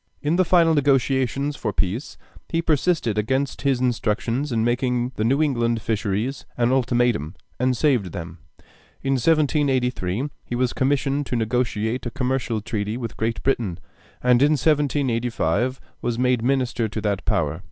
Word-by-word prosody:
In 150 +3 0
the 185 - +4
final 170 -2 +4
negotiations 135 0 +1
for 110 -6 -2
peace, 100 +7 -2 0.3
he 165 0 0
persisted 155 - +1
against 130 +5 -1
his 135 -3 +1
instructions 125 +2 0
in 115 -2 +1
making 125 0 0
the 110 - -1
New 135 +7 +3
England 120 -5 +1
fisheries 110 +3 -2
an 120 0 +2
ultimatum, 120 - +1 0.2
and 125 0 +1
saved 120 - +2
them. 85 0 -7 0.6
In 135 - 0
1783 135 - +1 0.2
he 120 - -5
was 125 0 0
commissioned 140 +1 0
to - - -2
negotiate 120 0 -1
a - - -1
commercial 125 -3 -1
treaty 105 +1 -3
with 115 -3 -5
Great 115 +1 -2
Britain, 115 -10 0 0.5
and 125 0 +4
in 145 +2 +5
1785 130 - +1 0.2
was 120 -1 -1
made 125 -2 +2
minister 125 -3 +1
to 110 - -4
that 100 -2 -1
power. - - 0
125 Hz, 150 wpm, -23 LUFS, 115-135 Hz, 0.6 s, in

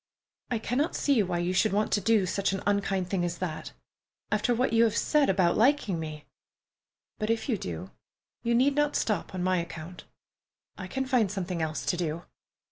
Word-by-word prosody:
"I 245 - 0
cannot 250 +8 -1
see 275 -6 +3
why 180 -3 -1
you 175 +1 0
should 210 +2 +2
want 210 +1 +1
to 205 - +2
do 215 -1 +3
such 195 +2 0
an 195 - -3
unkind 195 -2 0
thing 185 -1 -1
as 175 -1 -2
that, 165 -4 -4 0.6
after 215 +3 +2
what 245 0 +1
you 230 0 +5
have 225 -2 +2
said 300 -2 +3
about 185 -3 +3
liking 235 - +2
me, 155 -2 -6 0.9
but 215 0 -2
if 230 0 0
you 245 - +1
do, 90 - -6 0.5
you 235 0 +1
need 265 +4 +4
not 295 +1 +1
stop 210 -3 -1
on 180 - -2
my 185 0 +2
account. 170 +1 -7 0.7
I 185 - -7
can 265 +7 -2
find 250 -6 +2
something 185 -4 -3
else 155 -1 -2
to 175 - 0
do. 170 -1 -2
195 Hz, 195 wpm, -28 LUFS, 175-230 Hz, 0.9 s, you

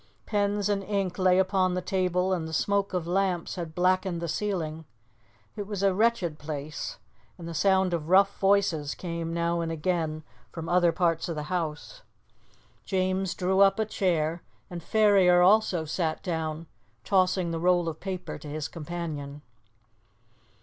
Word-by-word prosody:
Pens 205 -1 0
and 205 -1 0
ink 195 -2 -2
lay 185 -1 +4
upon 190 -1 +2
the - - 0
table 185 0 0
and 165 -3 -2
the 160 - -8
smoke 200 +4 +1
of 180 -3 -2
lamps 180 -1 0
had 165 -3 -6
blackened 185 0 +1
the 170 - -3
ceiling. 160 -4 -3 0.7
It 205 -2 -5
was 205 -2 -4
a 195 -1 +4
wretched 195 -7 +1
place, 150 0 -5 0.4
and 170 - -8
the 170 - -5
sound 190 +2 +2
of 165 -2 -3
rough 195 +2 +4
voices 195 -7 +2
came 170 -2 -4
now 170 0 0
and 165 -1 -2
again 160 -1 -2 0.3
from 165 -1 -6
other 175 -1 +3
parts 165 -1 0
of 165 - -3
the 150 - -4
house. 170 - -4 0.8
James 185 -1 -1
drew 190 +1 0
up 195 0 +5
a 220 - +1
chair, 170 -5 0 0.3
and 175 -1 -6
Ferrier 195 -3 +4
also 190 -4 +3
sat 160 0 -2
down, 160 -2 -3 0.4
tossing 185 -1 +2
the 165 - -2
roll 175 0 +2
of 160 -1 -4
paper 185 -4 -5
to 150 - -10
his 150 +1 -4
companion. 150 -3 -6
180 Hz, 160 wpm, -27 LUFS, 165-190 Hz, 0.8 s, up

